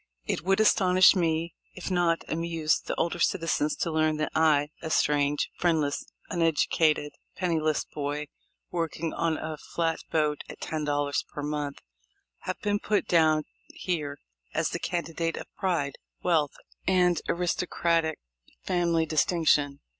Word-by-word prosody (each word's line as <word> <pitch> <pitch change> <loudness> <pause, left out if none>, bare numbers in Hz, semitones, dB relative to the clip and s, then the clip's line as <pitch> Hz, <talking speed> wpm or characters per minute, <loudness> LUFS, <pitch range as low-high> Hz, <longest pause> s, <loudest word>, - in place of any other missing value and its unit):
It - - -1
would 195 +4 +2
astonish 185 -3 +6
if 170 +2 -2
not 175 -2 +2
amuse 165 -1 0
the - - -4
older 170 +1 -1
citizens 165 -3 +1
to 170 - -2
learn 155 -1 +2
that 155 - -1
I 150 -2 +3
(a 160 - -4
strange, 145 -1 +2
friendless, 160 -5 +1 0.2
unedutated, 160 -3 +2 0.2
penniless 160 -4 0
boy, 145 0 -3 0.5
working 165 -1 -2
on 165 -2 0
a 155 -1 -5
flat 165 -1 -1
boat 150 -2 +1
at - - -9
ten 155 -1 -3
dollars 145 -1 0
per 145 - -5
month) 145 -1 -3 0.6
have - - -4
been 205 0 +1
put 210 0 0
down 155 -2 +4 0.3
here 150 -6 -3 0.4
as - - +1
the - - -3
candidate 165 -1 -2
of - - -6
pride, 165 -7 0 0.3
wealth, 160 -5 +2 0.3
and 180 -3 +3
aristo 180 +1 0
cratic 165 -2 +1 0.5
family 170 -3 +1
distinction. 155 -3 +2
160 Hz, 135 wpm, -28 LUFS, 150-170 Hz, 0.6 s, astonish